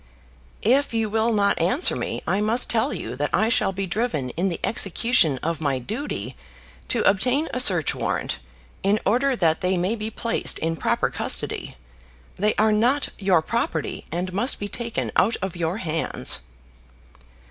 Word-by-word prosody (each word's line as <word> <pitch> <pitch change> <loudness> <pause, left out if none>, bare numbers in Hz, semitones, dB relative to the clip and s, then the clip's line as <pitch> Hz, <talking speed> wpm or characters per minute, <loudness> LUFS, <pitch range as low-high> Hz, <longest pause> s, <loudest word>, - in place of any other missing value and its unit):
"If 255 +2 +2
you 220 -2 0
will 225 +2 +1
not 200 -4 +1
answer 220 - +2
me, - - -4
I 195 - 0
must 225 +4 +3
tell 225 -2 +1
you 115 +3 -5
that 145 +1 -1
I 220 - +2
shall 235 - +2
be 195 +1 -3
driven 175 - -2
in 185 +7 -1
the 170 - -4
execution 195 - +2
of 165 -1 -2
my 140 -3 0
duty 220 - -5 0.5
to 235 - +1
obtain 250 +10 +2
a 255 - -1
search 180 - +4
warrant, - - -3 0.4
in 200 +2 +2
order 255 +6 +2
that 165 -7 +1
they 185 0 +1
may 180 +5 0
be 215 -1 -4
placed 230 +1 +3
in 165 +1 -2
proper - - 0
custody. - - 0 0.6
They 210 +3 0
are 215 +1 +3
not 245 +7 +2
your 190 -5 +2
property, 165 -6 -3
and 180 +2 -3
must 235 +8 +2
be 205 - -3
taken 235 +2 -3
out 225 +5 +3
of 190 -2 -3
your 170 +2 -2
hands." 165 -6 -1
205 Hz, 170 wpm, -23 LUFS, 175-230 Hz, 0.6 s, search